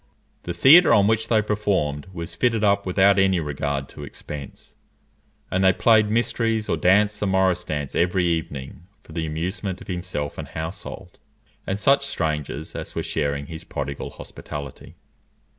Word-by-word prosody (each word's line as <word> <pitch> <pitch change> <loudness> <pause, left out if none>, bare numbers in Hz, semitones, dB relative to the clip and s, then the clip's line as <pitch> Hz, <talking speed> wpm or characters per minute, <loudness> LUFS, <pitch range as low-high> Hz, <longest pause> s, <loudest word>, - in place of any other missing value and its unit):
The 85 - -3
theatre 150 - +7
on 100 - +5
which 110 +1 +1
they 110 -2 +3
performed 95 -9 -1
was 85 -2 -7
fitted 115 +4 +1
up 100 -1 +2
without 95 +2 +4
any 95 -2 +3
regard 70 -2 -3
to 75 - -10
expense, 70 0 -9 0.8
and 95 +1 +1
they 95 - +6
played 110 -2 +4
mysteries 115 -1 0
or - - +1
danced 100 +3 +3
the 105 - 0
morris 95 -2 +2
dance 75 -3 -4
every 90 +1 +1
evening 80 -1 -3 0.2
for - - -16
the 80 0 -3
amusement 90 +4 -3
of - - -11
himself 90 -5 -4
and - - -6
household, 85 +2 -7 0.5
and 95 - -1
such 140 +5 +3
strangers 75 - -3
as - - -6
were - - -2
sharing 70 0 -2
his 80 +2 -8
prodigal 70 -4 -5
hospitality. 70 -2 -9
90 Hz, 160 wpm, -23 LUFS, 75-105 Hz, 0.8 s, theatre